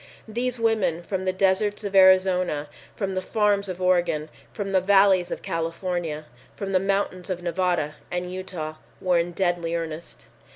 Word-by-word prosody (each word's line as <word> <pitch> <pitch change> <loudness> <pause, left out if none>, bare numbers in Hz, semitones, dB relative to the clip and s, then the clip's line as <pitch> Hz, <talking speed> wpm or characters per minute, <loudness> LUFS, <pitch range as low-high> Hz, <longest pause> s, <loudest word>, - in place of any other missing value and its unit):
These 240 +2 -2
women 215 -7 +1
from 190 +1 -3
the 185 - +2
deserts 195 +3 +1
of 200 -1 -4
Arizona, 185 -5 +4 0.3
from 195 -2 -2
the 185 - -1
farms 205 0 +1
of 185 -1 -5
Oregon, 175 -4 +1 0.2
from 200 -3 -4
the 190 -1 +3
valleys 195 -2 +4
of - - -5
California, 165 -2 -3 0.3
from 195 -1 -4
the 185 - +3
mountains 195 -2 -1
of 180 -1 -3
Nevada 175 -4 0 0.2
and 180 0 -3
Utah, 175 -5 -5 0.2
were 180 -2 +2
in 170 +1 -1
deadly 175 -2 0
earnest. 165 0 -6
185 Hz, 160 wpm, -25 LUFS, 175-195 Hz, 0.3 s, Arizona